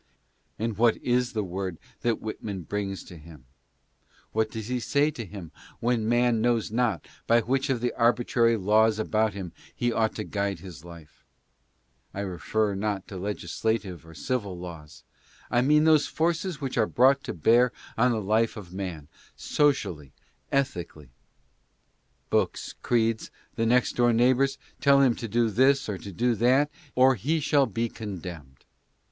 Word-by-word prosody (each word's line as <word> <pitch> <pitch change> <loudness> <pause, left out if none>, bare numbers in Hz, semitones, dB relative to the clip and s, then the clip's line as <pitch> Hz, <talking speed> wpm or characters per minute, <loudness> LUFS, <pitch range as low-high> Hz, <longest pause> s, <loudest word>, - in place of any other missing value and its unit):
And 110 -2 -3
what 115 -1 +4
is 125 0 0
the 110 -2 -1
word 95 -1 -4 0.2
that 120 -2 0
Whitman 105 -3 -5
brings 95 +2 -4
to 90 - -12
him? 75 -4 -14 0.9
What 110 0 0
does 110 -1 -6
he 125 0 -1
say 145 +5 +1
to 120 - -6
him 95 -4 -9 0.3
when 115 -2 0
man 120 -1 +3
knows 120 -2 +1
not 115 -7 0 0.2
by. 115 0 +5
which 135 +4 -1
of 125 -3 0
the 125 - 0
arbitrary 115 -1 +2
laws 110 +2 +3
about 110 0 +1
him 95 -4 -6 0.2
he 120 0 0
ought 110 -1 +1
to 105 - -3
guide 100 -2 -2
his 85 -4 -11
life? 85 -3 -14 0.9
I 100 - -3
refer 100 +3 -1
not 100 -1 -2
to 95 - -7
legislative 100 0 -3
or 80 0 -14
civil 100 -6 -3
laws. 85 -4 -10 0.5
I 120 - +3
mean 150 +4 +4
those 155 -2 +4
forces 170 0 -1
which 135 -3 -2
are 110 - +3
brought 135 +3 +4
to - - -4
bear 120 +9 +4 0.2
on 125 +2 +3
the 110 -2 -1
life 110 +3 +1
of 90 -4 -10
man, 90 -6 -5 0.3
socially, 90 - 0 0.4
ethically. 90 - -2 1.2
Books, - - 0
creeds 115 -2 +1 0.3
and 115 0 +1
next 125 0 +2
door 120 -1 +4
neighbors 130 +3 +3 0.2
tell 140 -1 +5
him 135 -3 +5
to 115 - -5
do 115 +1 +1
this 135 +6 +3
or 100 -3 -4
to 100 - -8
do 120 +7 +1
that, 130 +6 +3 0.2
or 130 +1 +6
he 145 - -1
shall 145 -2 +3
be 115 0 -1
condemned. 90 - -8
110 Hz, 160 wpm, -27 LUFS, 95-125 Hz, 1.2 s, or